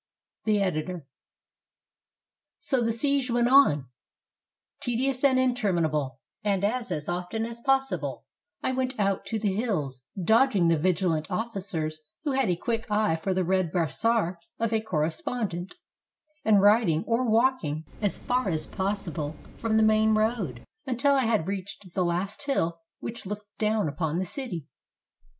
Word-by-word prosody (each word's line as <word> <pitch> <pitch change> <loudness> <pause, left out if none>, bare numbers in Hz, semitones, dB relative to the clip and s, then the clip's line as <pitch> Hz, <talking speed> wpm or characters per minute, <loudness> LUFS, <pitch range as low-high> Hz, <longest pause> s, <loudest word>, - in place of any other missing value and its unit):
The 215 -2 +3
Editor.] 175 -2 -2 1.5
So 265 -3 +1
the 230 -1 +1
siege 275 +2 +1
went 240 0 +2
on, 155 - +5 0.9
tedious 255 +2 0
and 265 -2 +5
interminable, 170 - +1 0.2
and 200 -2 +1
as 220 -8 -1
often 180 +6 -2
as 235 0 -7
possible 195 - 0 0.4
I - - +1
went 255 -1 -1
out 195 -1 0
to 225 - -1
the 205 -3 0
hills, 170 - -2 0.2
dodging 215 -2 +4
the 165 -2 +3
vigi 185 +2 +1
lant 160 -3 0
officers, 185 -8 -2 0.2
who 295 - 0
had 265 -5 +1
a 175 - +2
quick 225 +5 -3
eye 210 -5 +2
for 165 +4 -2
the 185 - +2
red 185 -2 +1
brassard 180 - +1 0.2
of 230 0 0
a 220 - +2
correspondent, 175 - -2 0.7
and 210 -2 +5
riding 205 -6 +4
or 235 +1 +1
walking 220 - +2 0.2
as 205 -2 0
far 250 -4 0
as 160 -3 0
possible 185 -7 -3 0.2
from 225 -1 +1
the 220 - +5
main 215 0 +4
road 215 - -1 0.2
until 260 +3 +2
I 265 -3 +3
had 220 -8 +2
reached 195 -1 -6
the 185 - +1
last 185 +8 -1
hill 170 -11 0 0.2
which 230 -3 -6
looked 205 0 -7
down 215 -3 +1
upon 155 +1 -2
the 185 +2 0
city. 180 - -4
205 Hz, 150 wpm, -27 LUFS, 170-235 Hz, 1.5 s, on